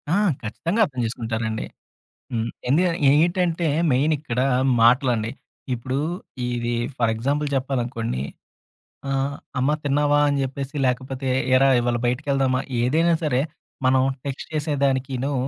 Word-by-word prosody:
ఆ! -, -, +3 dB, 0.2 s
ఖచ్చితంగా 170 Hz, -, -1 dB
అర్థం 130 Hz, -7 st, -8 dB
చేసుకుంటారండి. 110 Hz, -1 st, -3 dB, 0.7 s
హ్మ్. 115 Hz, -1 st, -1 dB, 0.2 s
ఏందుక 170 Hz, +7 st, +4 dB, 0.2 s
ఏంటంటే, 170 Hz, +2 st, +2 dB, 0.3 s
మెయిన్ 145 Hz, +5 st, +3 dB
ఇక్కడ 125 Hz, -5 st, -3 dB, 0.4 s
మాటలండి. 120 Hz, -2 st, +3 dB, 0.4 s
ఇప్పుడు 130 Hz, +3 st, -3 dB, 0.5 s
ఇది 120 Hz, -1 st, -2 dB, 0.3 s
ఫర్ 115 Hz, -2 st, +2 dB
ఎగ్జాంపుల్ 140 Hz, +6 st, -1 dB
చెప్పాలనుకోండి 120 Hz, -, -2 dB, 0.9 s
ఆహ్, 135 Hz, +1 st, 0 dB, 0.3 s
"అమ్మ 135 Hz, +3 st, +2 dB
తిన్నావా" 145 Hz, +1 st, +2 dB
అని 145 Hz, -1 st, +1 dB
చెప్పేసి, 135 Hz, +1 st, -5 dB
లేకపోతే 130 Hz, +1 st, -2 dB, 0.3 s
"ఏరా! 135 Hz, +1 st, +5 dB
ఇవాళ 120 Hz, 0 st, 0 dB
బయటికి 125 Hz, +5 st, -1 dB
వెళ్దామా" 130 Hz, -1 st, +2 dB, 0.2 s
ఏదైనా 160 Hz, +7 st, +3 dB
సరే 135 Hz, -4 st, +2 dB, 0.4 s
మనం 130 Hz, 0 st, +4 dB, 0.2 s
టెక్స్ట్ 140 Hz, -1 st, -5 dB
చేసేదానికిను, 140 Hz, -3 st, 0 dB
130 Hz, 115 wpm, -23 LUFS, 120-145 Hz, 0.9 s, ఏరా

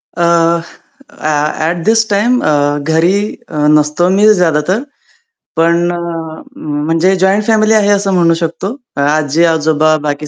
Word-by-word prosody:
A, 170 Hz, -1 st, 0 dB, 0.8 s
uh 155 Hz, -, -2 dB, 0.2 s
at 170 Hz, 0 st, -3 dB
this 225 Hz, +1 st, +2 dB
time 235 Hz, +5 st, +1 dB
अ, 145 Hz, -1 st, +1 dB
घरी 160 Hz, +4 st, +1 dB, 0.4 s
अ, 155 Hz, -, -7 dB, 0.2 s
नसतो 150 Hz, +4 st, +1 dB
मी 210 Hz, +3 st, +4 dB
ज्यादा 165 Hz, -6 st, +1 dB
तर. 220 Hz, +8 st, 0 dB, 0.7 s
पण 170 Hz, +1 st, +1 dB
अ, -, -, -4 dB, 0.9 s
म्हणजे 165 Hz, +4 st, +1 dB
जॉइंट 195 Hz, +2 st, +2 dB
फॅमिली 220 Hz, -1 st, +2 dB
आहे 210 Hz, -2 st, +2 dB
असं 195 Hz, -1 st, -2 dB
म्हणू 170 Hz, -2 st, +3 dB
शकतो. 170 Hz, +7 st, -4 dB, 0.3 s
आजी-आजोबा 155 Hz, +1 st, +1 dB
बाकी 145 Hz, +1 st, -4 dB
170 Hz, 135 wpm, -13 LUFS, 155-200 Hz, 0.9 s, मी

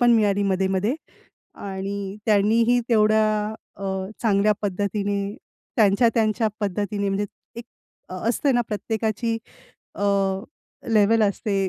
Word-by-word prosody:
पण 240 Hz, -1 st, +5 dB
मिळाली 205 Hz, -3 st, +3 dB
मध्ये-मध्ये 190 Hz, +3 st, +1 dB, 0.7 s
आणि 195 Hz, 0 st, -4 dB
त्यांनीही 225 Hz, +3 st, +3 dB
तेवढ्या 215 Hz, -1 st, +3 dB, 0.3 s
अ, 195 Hz, -, -6 dB, 0.4 s
चांगल्या 210 Hz, -1 st, +3 dB
पद्धतीने 200 Hz, +1 st, -2 dB, 0.4 s
त्यांच्या, 215 Hz, +2 st, +4 dB
त्यांच्या 220 Hz, 0 st, +2 dB
पद्धतीने 200 Hz, 0 st, -1 dB
म्हणजे 195 Hz, +1 st, 0 dB, 0.3 s
एक 235 Hz, -, -7 dB, 0.5 s
असते 230 Hz, +9 st, 0 dB
ना, 245 Hz, -, +3 dB
प्रत्येकाची 220 Hz, +1 st, -1 dB, 0.6 s
अ, -, -, -5 dB, 0.9 s
लेव्हल 215 Hz, +1 st, +4 dB
असते 200 Hz, -1 st, 0 dB
210 Hz, 105 wpm, -23 LUFS, 200-225 Hz, 0.9 s, पण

